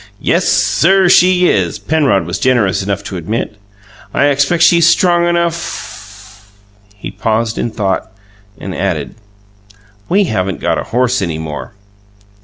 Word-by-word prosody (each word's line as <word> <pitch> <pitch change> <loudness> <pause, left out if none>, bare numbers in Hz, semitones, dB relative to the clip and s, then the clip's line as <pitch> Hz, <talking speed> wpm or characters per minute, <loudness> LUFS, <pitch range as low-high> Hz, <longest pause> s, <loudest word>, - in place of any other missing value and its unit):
"Yes, - - 0
sir 190 +2 +3
she 180 0 +4
is!" 90 -4 0
Penrod 140 - +1
was 85 +3 -4
generous 120 -8 +1
enough 100 0 -3
to 95 -2 -6
admit. 105 +5 -4 0.6
"I 145 - +3
expect 145 +5 +1
she's 170 0 +5
strong 175 0 +3
enough 170 - -5 0.3
" 105 0 -31
He 105 - -8
paused 115 0 -2
in - - -1
thought, 100 -4 -3 0.5
and - - -6
added: - - -3 1.0
"We 200 +3 +3
haven't 95 - -2
got - - -1
a - - -5
horse 125 0 +1
any 85 -4 -2
more." 75 -4 -7
115 Hz, 140 wpm, -14 LUFS, -, 1.0 s, she's